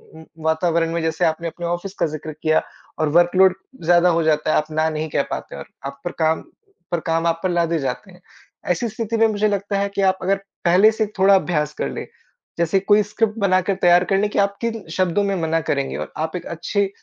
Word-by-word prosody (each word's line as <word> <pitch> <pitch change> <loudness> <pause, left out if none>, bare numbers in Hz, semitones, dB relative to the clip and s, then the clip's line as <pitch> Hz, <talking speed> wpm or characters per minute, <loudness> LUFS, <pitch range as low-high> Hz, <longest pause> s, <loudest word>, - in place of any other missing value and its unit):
म 160 - -11 0.2
वातावरण 165 +1 +1
में 170 - -1
जैसे 160 +2 0
आपने 165 +1 -1
अपने 170 +1 -6
ऑफिस 175 +3 -3
का - - +3
ज़िक्र 155 0 -6
किया 155 0 +3 0.4
और 155 - +1
वर्कलोड 175 +3 +5 0.3
ज़्यादा 175 +2 +4
हो 165 -1 +2
जाता 155 -1 +1
है - - +2
आप 155 +1 -2
ना 155 +1 +1
नहीं 155 0 -3
कह - - +1
पाते - - -5
और - - -8 0.2
आप 140 0 -6
पर 175 - -2
काम 160 0 +2 0.5
पर 175 - +1
काम 165 +1 +1
आप 165 0 0
पर 185 - +1
लादे 170 -1 +1
जाते 135 +8 -4
हैं। 180 - -18 0.5
ऐसी 230 +7 -1
स्थिति 225 +1 -3
में 225 0 +5
मुझे 215 -1 +1
लगता 200 0 -1
है 200 0 0
कि - - 0
आप 190 -1 +3
अगर 195 +2 +1 0.3
पहले 185 +5 +6
से 220 0 -1
थोड़ा 195 +1 +6
अभ्यास 160 -6 0
कर - - -3
लें, - - -5 0.5
जैसे 170 +3 +2
कोई 205 +2 +4
स्क्रिप्ट 215 +2 -1
बनाकर 185 -1 +2
तैयार 175 0 +5
कर 195 - +1
लें 205 +1 +1
कि - - -1
आप 200 0 +1
किन 225 -2 -3
शब्दों 185 +2 +1
में 200 -1 0
मना 165 0 0
करेंगे 140 -1 -1
और - - -6
आप 160 +2 -3
एक 180 - -5
अच्छी 195 +4 -1
175 Hz, 230 wpm, -21 LUFS, 160-200 Hz, 0.5 s, पहले